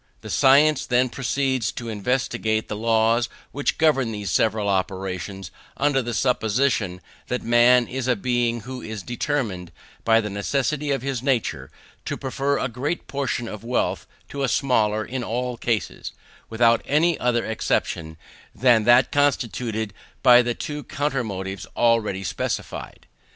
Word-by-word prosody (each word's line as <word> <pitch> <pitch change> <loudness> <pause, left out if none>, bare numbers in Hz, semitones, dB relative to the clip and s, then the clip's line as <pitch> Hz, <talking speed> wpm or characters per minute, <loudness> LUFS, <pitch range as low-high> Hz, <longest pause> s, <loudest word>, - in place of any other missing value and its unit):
The - - -7
science 140 +2 +4
then 125 0 +2
proceeds 130 -1 -1
to 120 - -6
investigate 110 0 -1
the 105 - -4
laws 115 +1 +2 0.2
which 145 +1 -1
govern 135 -7 +2
these 105 -4 -4
several 105 +4 +1
operations, 95 -1 -3 0.3
under 140 -1 +2
the 120 -1 -4
supposition 110 -6 +1 0.3
that 125 - -2
man 120 +1 +5
is 130 0 -4
a 125 - +3
being 120 +1 0
who 125 +3 -7
is 110 -3 -6
determined, 120 - -3 0.3
by 115 0 +4
the 105 -2 -3
necessity 140 +8 -1
of 135 -3 0
his 135 -3 -2
nature, 115 - -1 0.4
to - - -3
prefer 140 +1 -1
a - - -1
greater 130 +8 -3
portion 135 -4 -3
of 105 0 -8
wealth 120 +2 -1 0.2
to 140 - -5
a 135 - +2
smaller 110 -5 +1
in 130 0 -4
all 125 +2 -2
cases, 115 -2 -3 0.4
without 115 0 +3
any 160 +4 +3
other 120 -1 +1
exception 80 -7 -2 0.4
than 120 -4 +4
that 120 +2 +5
constituted 120 -6 0 0.3
by 120 0 +8
the 120 -1 -2
two 150 -1 -5
counter 145 -4 -2
motives 95 -2 -5
already 110 -5 +2
specified. 90 - -4
120 Hz, 145 wpm, -23 LUFS, 110-130 Hz, 0.4 s, by